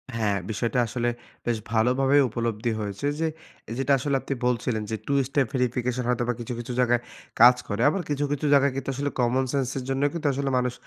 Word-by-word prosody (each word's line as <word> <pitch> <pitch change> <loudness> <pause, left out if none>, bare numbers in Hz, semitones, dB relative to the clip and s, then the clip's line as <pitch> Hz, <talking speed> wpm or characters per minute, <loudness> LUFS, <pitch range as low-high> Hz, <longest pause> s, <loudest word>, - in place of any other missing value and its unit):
হ্যাঁ, 105 -3 +1
বিষয়টা 115 +4 0
আসলে 120 +2 -1 0.4
বেশ 120 -1 +1
ভালোভাবেই 135 +5 +3
উপলব্ধি 115 0 -2
হয়েছে 105 +5 -3
যে, 165 - +1 0.4
এ - - -6
যেটা 135 +1 +2
আসলে 140 +1 0
আপনি - - -3
বলছিলেন 120 -2 0
যে, - - 0
2 140 - 0 0.2
স্টেপ 140 -3 +1
ভেরিফিকেশন 125 0 0
হয়তোবা 120 0 +1
কিছু, 120 +1 -5
কিছু 120 +1 -5
জায়গায় 120 -1 +3 0.4
কাজ 125 +2 +9
করে। 100 +3 -2
আবার 190 +5 -1
কিছু, 145 0 0
কিছু 145 0 -1
জায়গায় 140 -1 +5
কিন্তু 135 0 -4
আসলে 145 +2 -1
কমন 125 +2 +2
সেন্স 135 -3 0
এর 130 - -3
জন্যেও 135 +2 +1
কিন্তু 165 -3 -2
আসলে 140 +1 -1
মানুষ 125 -1 0
125 Hz, 200 wpm, -25 LUFS, 115-135 Hz, 0.4 s, কাজ